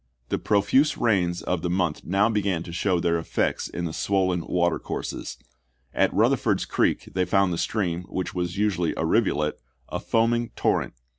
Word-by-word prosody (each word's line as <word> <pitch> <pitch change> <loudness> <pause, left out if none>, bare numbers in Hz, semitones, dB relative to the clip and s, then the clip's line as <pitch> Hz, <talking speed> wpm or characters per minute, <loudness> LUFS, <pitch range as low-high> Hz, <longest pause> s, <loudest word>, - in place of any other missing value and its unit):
The - - 0
profuse 130 +9 +2
rains 90 -7 +1
of 90 -2 -1
the 90 - -2
month 90 -3 0
now 100 +4 +2
began 100 -6 0
to 85 - -9
show 90 +1 +1
their 85 0 +1
effects 80 - -1
in 85 - -4
the 80 - -4
swollen 95 -2 0
water 85 -1 +1
courses. - - -5 0.6
At - - +2
Eutherford's - - +2
Creek - - 0
they 95 - +1
found 95 -2 +2
the 85 - -3
stream, 90 -5 -1
which 95 - -3
was 90 0 -3
usually 95 -5 0
a - - 0
rivulet, 75 -2 +1 0.3
a - - -3
foaming 115 +1 +1
torrent. - - 0
90 Hz, 170 wpm, -25 LUFS, 85-100 Hz, 0.6 s, profuse